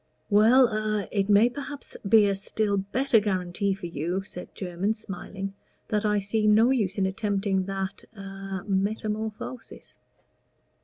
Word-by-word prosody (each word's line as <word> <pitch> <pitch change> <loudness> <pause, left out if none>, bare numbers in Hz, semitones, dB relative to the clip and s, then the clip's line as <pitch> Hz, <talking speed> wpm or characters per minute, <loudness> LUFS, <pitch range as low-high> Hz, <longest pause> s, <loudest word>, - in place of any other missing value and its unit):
"Well 230 +5 +6
a 215 -2 -1
it 200 -1 0
may 205 +3 +6
perhaps 285 +3 -7
be 215 -1 +7
a 200 - +1
still 200 +1 -1
better 225 +6 +2
guarantee 195 -1 -1
for 195 - -8
you," 170 +4 -2
said 180 -2 -8
Jermyn, 190 +3 -2
smiling, 195 -1 -6 0.4
"that 210 0 0
I 210 0 +2
see 210 +2 0
no 220 +4 +5
use 210 -7 0
in 195 - +2
attempting 195 -1 0
that 195 0 -4
a 195 -1 -6
metamorphosis." 215 +3 -3
200 Hz, 140 wpm, -26 LUFS, 195-215 Hz, 0.4 s, be